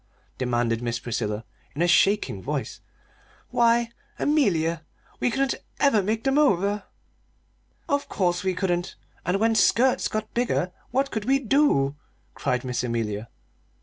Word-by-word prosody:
demanded 120 -2 0
Miss 120 -1 -1
Priscilla, 110 -2 -3 0.3
in 160 - +1
a - - +3
shaking 200 +4 +3
voice. - - -4 0.7
"Why, 235 0 +3 0.3
Amelia, 170 - +1 0.4
we - - +2
couldn't 270 +2 +1 0.3
ever 275 -7 +4
make 220 +3 -1
them 270 +2 +2
over!" 205 -7 +2 1.0
"Of 285 0 -1
course 175 -2 0
we 185 -1 0
couldn't! 175 -2 -1 0.3
And 185 +2 +1
when 225 +1 +3
skirts 235 +4 +3
got 215 0 -4
bigger, 235 -7 0 0.2
what 270 +2 0
could 220 -2 -3
we 270 +1 +4
do?" 240 - +2 0.4
cried 125 -1 -1
Miss 125 -1 -2
Amelia. 115 -2 -2
195 Hz, 135 wpm, -25 LUFS, -, 1.0 s, ever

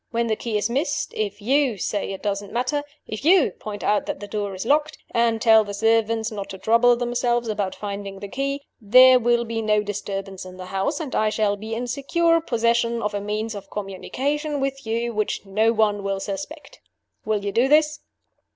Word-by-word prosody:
When 235 0 0
the 220 -1 0
key 220 -1 -2
is 205 - 0
missed, 285 +5 -1
if 205 -1 -3
you 265 -1 +2
say 200 +2 -2
it 195 - -7
doesn't 200 -1 -2
matter 250 +5 0 0.2
if 215 +4 -6
you 345 0 +5
point 205 -1 -8
out 210 0 +1
that - - -3
the 205 - -7
door 205 -2 -3
is 185 - -5
locked, 300 +4 +1
and 235 -1 +2
tell 220 -1 +6
the 205 -1 -6
servants 225 +1 +1
not 200 -2 -6
to 190 - -7
trouble 230 +5 +4
themselves 240 0 0
about 205 -3 -2
finding 200 -1 -6
the 200 - -7
key 275 +5 -3 0.2
there 255 +4 +7
will 235 0 +2
be 225 0 -3
no 210 -1 +2
disturbance 195 -2 -5
in 185 0 -11
the 185 - -7
house; 195 +11 -2
and 300 -5 -5
I 215 - +2
shall 210 -1 +1
be 220 +2 -5
in 240 +2 -3
secure 330 +6 +1
possession 235 -3 +1
of 210 0 -1
a 205 - -2
means 215 +2 -3
of 200 -1 -9
communication 280 - -3
with 270 -2 -3
you 235 +1 -1
which 215 -1 -2
no 215 +3 +2
one 210 -2 +1
will 195 0 -2
suspect. 195 +7 -7 0.4
Will 210 -2 -1
you 200 - -1
do 235 +6 +3
this? 300 +1 +3
225 Hz, 205 wpm, -23 LUFS, 205-245 Hz, 0.4 s, there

